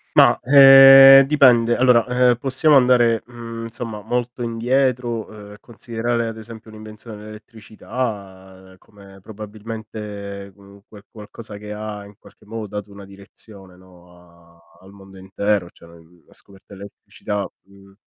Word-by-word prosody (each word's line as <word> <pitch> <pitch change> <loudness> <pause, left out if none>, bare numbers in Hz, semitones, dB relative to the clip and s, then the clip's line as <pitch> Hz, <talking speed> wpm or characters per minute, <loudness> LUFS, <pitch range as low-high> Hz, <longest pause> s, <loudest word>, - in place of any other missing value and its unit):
Mah, - - +4
ehm, 135 0 +8
dipende. 125 -5 +3
Allora, 125 -2 +3
ehm, 125 0 +1
possiamo 140 +4 +1
andare, 125 -3 +2
mhmm, 115 -1 -10
insomma 115 -2 -8
molto 120 +3 -5
indietro, 120 0 -2
uhm, 105 -1 -14
considerare 115 +1 -5
ad 115 0 -8
esempio 110 0 -13
l'invenzione 110 +1 -13
dell'elettricità 105 -3 -10
come 100 -1 -19
probabilmente, 105 -1 -10
mhmm, 100 0 -19
qual 105 -2 -17
qualcosa 105 0 -12
che 105 0 -10
ha, 105 -1 -8
in 100 +1 -17
qualche - - -22
modo, 110 +1 -8
dato 105 0 -9
una 100 0 -13
direzione, 100 -1 -17
no, 90 -1 -21
a 85 -1 -24 0.2
al 95 +1 -18
mondo 95 -1 -17
intero, 95 0 -3
cioè 85 - -20
ne 85 0 -18
mhmm, 85 0 -25
la - - -24
scoperta 95 0 -17
dell'elettricità, 100 +1 -8 0.2
mhmm 100 0 -21
105 Hz, 140 wpm, -19 LUFS, 100-120 Hz, 0.2 s, ehm